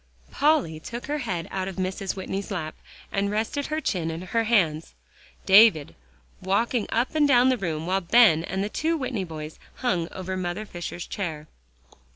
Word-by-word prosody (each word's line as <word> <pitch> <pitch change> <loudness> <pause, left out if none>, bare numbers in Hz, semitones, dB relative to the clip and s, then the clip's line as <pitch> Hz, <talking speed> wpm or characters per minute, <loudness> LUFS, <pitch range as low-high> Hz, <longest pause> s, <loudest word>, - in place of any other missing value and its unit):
Polly 285 - +2
took 235 +9 -7
her 295 +1 -2
head 180 - -3
out 190 -1 -2
of 190 - -5
Mrs. 190 +1 -3
Whitney's 195 +1 -4
lap, 160 -6 -4 0.4
and 200 0 0
rested 225 +7 -2
her 310 +1 -1
chin 180 - -1
in 165 +2 -5
her 225 +5 0
hands, 165 - +1 0.5
Davie 195 -7 +6 0.5
walked 200 +6 0 0.2
up 235 +3 0
and 305 -2 +3
down 255 -2 +5
the 260 - +3
room, 160 -6 -3
while 190 +2 0
Ben 175 -4 +5
and 190 +2 -2
the - - -1
two 325 +8 0
Whitney 250 -8 -3
boys 155 -2 -8 0.2
hung 180 -10 -1
over 185 0 -5
Mother 185 +3 -3
Fisher's 175 -2 -6
chair. 160 -6 -5
190 Hz, 175 wpm, -25 LUFS, 170-235 Hz, 0.5 s, Davie